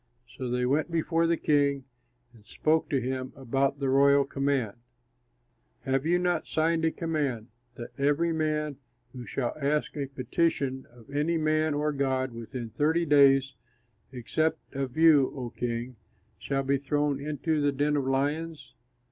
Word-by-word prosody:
So 130 -2 -4
they 125 0 0
went 145 +6 +1
before 165 0 +1
the 170 0 +2
king 140 -2 +1 0.5
and 110 -3 -19
spoke 155 +8 0
to 140 - +1
him 130 +1 -4
about 135 +2 0
the 140 - -1
royal 140 +1 +4
command: 135 -6 -1 1.1
"Have 135 +3 -1
you 175 +1 +3
not 180 -2 0
signed 160 +1 +1
a - - +4
command, 145 -10 -2 0.3
that 120 - -8
every 145 +4 +2
man 150 -2 -1 0.4
who 125 -2 -8
shall 125 -3 -2
ask 150 +2 0
a 140 -2 -3
petition 135 -1 -1
of 120 +2 -17
any 150 +4 0
man 155 -1 +1
or 150 +1 0
god 130 -2 0
within 115 0 -7
thirty 160 +8 +1
days, 140 -2 +5 0.6
except 135 +6 -2
of 135 -1 -4
you, 155 -5 +5
O 125 -4 -5
king, 120 0 -4 0.4
shall 135 +7 -1
be 135 0 +1
thrown 145 0 0
into 150 +1 -1
the 145 0 +2
den 145 +2 0
of 140 -2 -1
lions?" 150 +4 -2
140 Hz, 155 wpm, -28 LUFS, 130-155 Hz, 1.1 s, days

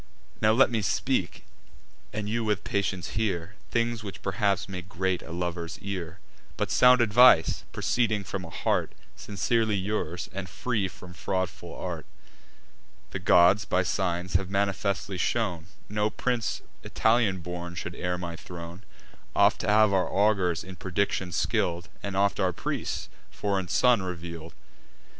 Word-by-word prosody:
Now 110 - +5
let 125 +3 +5
me 115 -2 +1
speak, 90 - -1 0.7
and 105 -1 -3
you 115 +2 -1
with 105 -3 0
patience 95 -4 -1
hear, 95 -4 -2 0.2
Things 115 -1 0
which 100 -2 -8
perhaps 100 0 0
may 95 -2 -5
grate 95 0 -2
a - - -10
lover's 85 -1 -3
ear, 95 -3 -5 0.4
But - - -1
sound 125 0 +6
advice, 120 -5 +6
proceeding 110 -4 +1
from 95 -1 -4
a 85 - -8
heart - - 0 0.2
Sincerely 110 +2 0
yours, 95 -4 -2
and 95 -1 -5
free 110 -1 -1
from 90 0 -12
fraudful 95 +2 -3
art. - - -5 1.0
The - - -3
gods, 90 +4 +5
by 90 0 +1
signs, 90 0 -1
have 95 0 +1
manifestly 100 -1 -1
shown, 90 -7 -1 0.2
No 105 +1 0
prince 120 0 -2 0.2
Italian 110 -5 +2
born 85 0 -6
should 85 -1 -5
heir 90 +1 -2
my 85 -1 -5
throne: 85 +1 -9 0.5
Oft - - +4
have 105 -1 +4
our 95 -1 +2
augurs, 95 -5 +2
in 95 -1 -10
prediction 95 -1 -1
skill'd, 85 +1 0
And 100 -1 -4
oft 100 +1 +2
our 95 -2 +2
priests, - - -3 0.2
a - - -21
foreign 100 -3 -1
son 115 +6 +4
reveal'd. 85 -3 -6
95 Hz, 145 wpm, -27 LUFS, 90-105 Hz, 1.0 s, sound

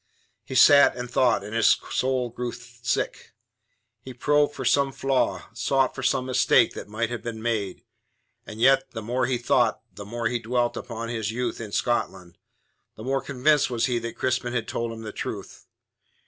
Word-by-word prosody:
He 130 - -7
sat 140 +2 +7
and 125 0 -6
thought, 125 -4 +2
and 105 +2 -8
his 115 - +4
soul 130 -2 0
grew 120 0 -4
sick. 120 0 -4 0.7
He 125 +2 -10
probed 145 +3 +2
for 130 - -5
some 140 +2 +3
flaw, 135 -1 -1
sought 130 +2 +1
for - - -6
some 130 - +1
mistake 125 -2 +3
that - - -8
might 110 +3 -2
have 120 - -4
been 115 -2 -6
made. 110 -5 -2 0.6
And 110 - -8
yet 135 +2 +4
the 110 -2 -5
more 120 +3 0
he 125 -1 0
thought, 120 - +1
the 100 - -8
more 115 +3 -5
he 120 +1 -1
dwelt 120 +1 0
upon 115 -1 -6
his 110 -2 -2
youth 120 0 -3
in 105 -2 -7
Scotland, 95 -8 -2 0.6
the 110 - -10
more 135 +2 0
convinced 140 +2 +2
was 120 -2 0
he 125 -2 0
that 115 0 -6
Crispin 125 -1 -1
had 115 -3 -2
told 115 0 -3
him 115 0 -8
the 110 - -6
truth. - - -7
120 Hz, 185 wpm, -25 LUFS, 115-130 Hz, 0.7 s, sat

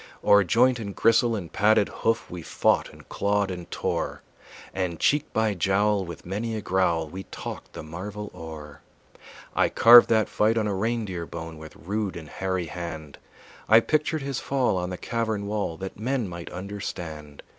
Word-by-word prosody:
O'er 100 0 +6
joint 125 +7 +3
and 100 -3 -6
gristle 115 0 +3
and 90 -6 -6
padded 105 0 +4
hoof 115 0 -1
We 90 -1 -7
fought - - +1
and - - -16
clawed 100 -1 0
and 90 -2 -7
tore, - - -3 0.5
And 90 -4 -2
cheek 150 0 +2
by 110 -1 +1
jowl 100 +2 +1
with 85 -2 -9
many 110 +5 -3
a 110 - -3
growl 85 -5 +1
We 95 +5 -8
talked - - -8
the - - -7
marvel 100 +6 -7
o'er. 75 -3 -9 0.7
I - - +3
carved 120 +1 +8
that 110 -2 +3
fight 110 +2 +1
on 110 - +1
a 105 - 0
reindeer 100 -4 -2
bone 80 -1 -7
With 80 0 -11
rude 100 0 -3
and 80 -2 -9
hairy 95 -2 -2
hand; 80 -3 -7 0.5
I 110 +1 +9
pictured 155 +4 0
his 135 -2 -3
fall 130 -6 0
on 90 0 -2
the 90 - -5
cavern 110 -2 -2
wall 100 -5 -2
That 95 +2 -7
men 125 0 -1
might 85 -1 -8
understand. 85 -6 -7
100 Hz, 175 wpm, -26 LUFS, 85-110 Hz, 0.7 s, I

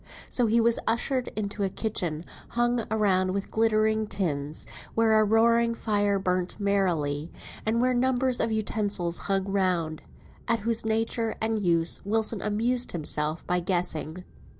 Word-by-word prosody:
So 245 -2 +2
he 230 +2 +3
was 230 0 +3
ushered 250 +2 0
into 205 -1 -3
a 195 - +1
kitchen 175 -7 -3 0.2
hung 240 -1 0
round 190 -3 +1
with 200 - -4
glittering 220 -1 +2
tins, 150 -7 -3 0.3
where 225 -1 +4
a - - +5
roaring 230 +2 +3
fire 205 -3 +1
burnt 185 0 -1
merrily, 170 -7 0 0.4
and 225 +2 +2
where 255 +1 +2
numbers 255 0 +1
of 230 - +1
utensils 205 -5 -1
hung 195 -1 +2
round, 180 -5 0 0.5
at 230 -1 +1
whose 230 +1 +2
nature 225 +1 -1
and 220 0 0
use 170 -3 +2
Wilson 220 +1 0
amused 240 +4 0
himself 155 -1 -2
by 180 0 +1
guessing. 175 -1 -1
210 Hz, 145 wpm, -27 LUFS, 180-225 Hz, 0.5 s, a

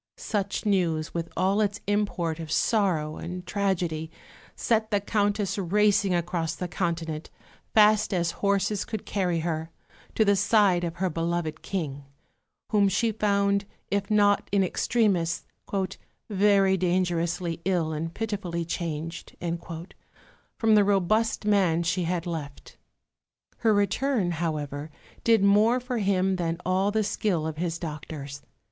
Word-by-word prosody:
Such 205 - -2
news, 170 -6 +1
with 170 0 -3
all 195 +3 +2
its 205 -1 0
import 195 -6 -1
of 160 -1 -6
sorrow 170 -8 +1
and 180 +1 -6
tragedy, 180 -5 -1 0.5
set 220 -2 +1
the 205 - +2
Countess 205 0 0
racing 200 0 +2
across 170 -2 -1
the 180 - -4
Continent, 165 -3 -3 0.5
fast 215 0 +5
as 170 -3 +1
horses 200 0 +1
could 220 -3 -6
carry 180 -5 0
her, 160 -1 -2 0.5
to 220 - +3
the 200 0 +4
side 200 -3 +3
of 170 -1 -3
her 185 +1 0
beloved 165 -1 -2
King, 145 -7 -4 0.7
whom 205 -2 +4
she 225 +4 +1
found, 200 -1 +1 0.3
if 200 0 0
not 205 -1 +3
in 200 -1 +3
extremis, 185 -4 +1 0.9
"very 195 -1 +4
dangerously 175 -2 0
ill 170 -4 0
and 165 +2 -4
pitifully 195 -6 -3
changed" 165 0 -5 1.2
from 225 -1 +3
the 210 -1 +6
robust 205 +3 +1
man 185 -5 +3
she 175 +1 0
had 175 0 -1
left. 155 -5 -6 0.8
Her 225 - +3
return, 205 0 +1
however, 155 -3 -3 0.3
did 225 -3 +4
more 210 +5 +5
for 250 -1 -3
him 190 -2 +1
than 170 -1 -1
all 185 +2 +2
the 215 +1 +1
skill 200 -5 -1
of 160 -1 -4
his 170 0 -2
doctors. 150 -3 -7
185 Hz, 135 wpm, -26 LUFS, 165-205 Hz, 1.2 s, the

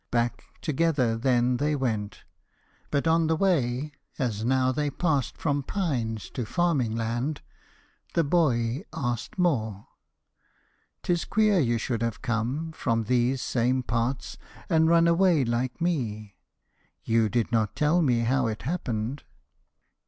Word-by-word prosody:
Back 120 -1 -1 0.2
Together 145 -6 +1
then 125 +1 +2
they 150 +3 0
went. 110 -7 -3 0.7
But 145 0 0
on 165 0 +3
the 160 - +2
way, 150 -6 +1 0.3
As 110 -5 -2
now 130 +1 +2
they 145 +3 -1
passed 145 -4 -1
from 145 -2 0
pines 130 - -2
to 125 - -3
farming 135 -4 0
land, 120 +6 -2 0.7
The 170 - +4
boy 140 -4 +1
asked 120 - -3
more. 110 - 0 1.1
"'T 175 - +1
is 170 - -1
queer 215 -3 +3
you 120 -6 +2
should 115 0 -2
have 115 0 -3
come 130 +7 -1
From 115 -7 -1
these 125 +3 +1
same 125 +1 +1
parts, 120 +3 -2 0.3
and 160 -2 +4
run 170 0 +5
away 170 -4 +4
like 120 +4 -2
me! 115 - -2 0.7
You 115 -1 +2
did 120 0 0
not 110 -3 +1
tell 150 +4 +3
me 125 -7 +2
how 130 +1 +1
it 110 -2 -4
happened." 130 -4 -3
130 Hz, 135 wpm, -27 LUFS, 115-155 Hz, 1.1 s, run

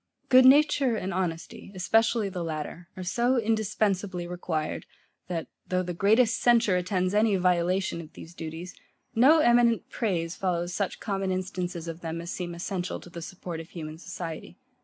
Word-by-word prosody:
Good 255 0 +7
nature 275 -3 +5
and 195 -2 -3
honesty, 175 0 -4
especially 220 +3 +2
the 180 -3 -4
latter, 160 +2 -5
are 185 - -5
so 240 +7 +1
indispensably 205 -5 0
required, 175 -3 -3 0.4
that, 170 -2 -3 0.2
though 185 0 0
the 180 0 -4
greatest 220 +6 +3
censure 235 -5 +4
attends 185 0 0
any 210 0 +3
violation 180 0 +1
of 155 - -13
these 165 - -11
duties, 165 +2 -7 0.4
no 285 +8 +6
eminent 240 -2 +3
praise 175 -7 -1
follows 175 -2 -1
such 200 0 -2
common 195 -3 -2
instances 185 -2 -3
of 165 +1 -6
them, 165 0 -4
as 170 +1 -6
seem 175 -1 -4
essential 180 +1 -3
to 175 - -14
the 170 - -7
support 175 -1 -6
of 165 +1 -9
human 155 -2 -7
society. 170 -2 -7
185 Hz, 160 wpm, -27 LUFS, 170-215 Hz, 0.4 s, Good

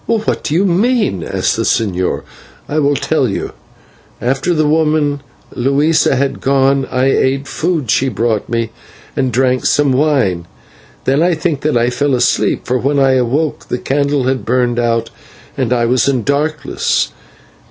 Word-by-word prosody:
"What 225 -2 0
do 150 - -1
you 190 +4 +3
mean?" 195 - +1
asked - - -1
the - - 0
señor. 95 -5 0 0.4
"I 155 - -1
will 145 -1 +2
tell 135 -4 0
you. 100 - -4 0.7
After 135 +7 -1
the 155 -2 +2
woman 150 -2 +1 0.3
Luisa 140 +4 +2
had 135 +1 -1
gone 135 0 +2
I 125 +1 0
ate 135 0 +1
the - - -12
food 160 - -1
she 130 +3 +2
brought 110 -2 -1
me 115 -1 -1 0.4
and 130 -3 0
drank 130 +1 +1
some 145 -2 +2
wine. 130 - +1 0.6
Then 135 +3 +2
I 175 0 +2
think 155 -3 -2
that 150 -4 +1
I 120 +1 +1
fell 140 +2 0
asleep, 125 0 +1
for 125 +1 0
when 140 +3 0
I 135 -1 +4
awoke 130 +5 0
the - - -2
candle 140 +1 0
had 130 0 -1
burned 120 0 0
out 115 -1 0 0.4
and 130 -4 -1
I 120 -1 +2
was 125 +3 +2
in 130 -4 0
darkness. 150 +2 -1
135 Hz, 165 wpm, -15 LUFS, 125-150 Hz, 0.7 s, I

